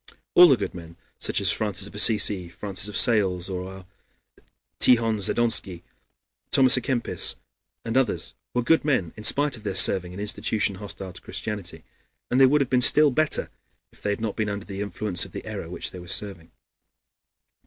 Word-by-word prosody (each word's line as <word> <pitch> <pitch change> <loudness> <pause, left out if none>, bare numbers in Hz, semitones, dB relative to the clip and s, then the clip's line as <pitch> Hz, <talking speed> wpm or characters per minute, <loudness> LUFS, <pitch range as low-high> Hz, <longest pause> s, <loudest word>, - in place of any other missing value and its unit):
All 180 0 +8
the 135 - +4
good 105 - -5
men, 85 -1 -12 0.2
such - - +1
as - - +1
Francis 105 -2 -1
of - - -8
Assisi, 105 -3 +3
and 85 - -14
Francis 100 +1 -1
of 105 - -3
Sales, 95 -6 +2
our 95 +1 -7 0.9
Tihon 115 -3 +3
Zadonsky, 100 -4 +1 0.7
Thomas 130 -1 +5
à 125 - 0
Kempis, 125 -3 -1 0.5
and 115 +1 -4
others, 130 -5 -1 0.2
were 125 - 0
good 165 +7 +2
men 130 - -1
in 105 - -11
spite 145 +2 +3
of 110 - -15
their 100 -3 -4
serving 90 -1 +3
an 90 - -10
institution 105 -1 -1
hostile 95 -2 -8
to - - -12
Christianity, 90 -7 -6 0.5
and 130 +2 +2
they 135 - +7
would 145 +2 +2
have 135 - -1
been 125 -1 +2
still 150 +3 +5
better 155 +4 0 0.4
if - - -23
they - - -3
had 100 +1 -3
not 110 -3 -3
been 110 -2 -2
under 100 0 -6
the 100 0 -7
influence 100 -2 -2
of - - -10
the - - -8
error - - -7
which - - -5
they 90 - -10
were 90 - -12
serving. 95 -3 -2
105 Hz, 190 wpm, -24 LUFS, 95-120 Hz, 0.9 s, All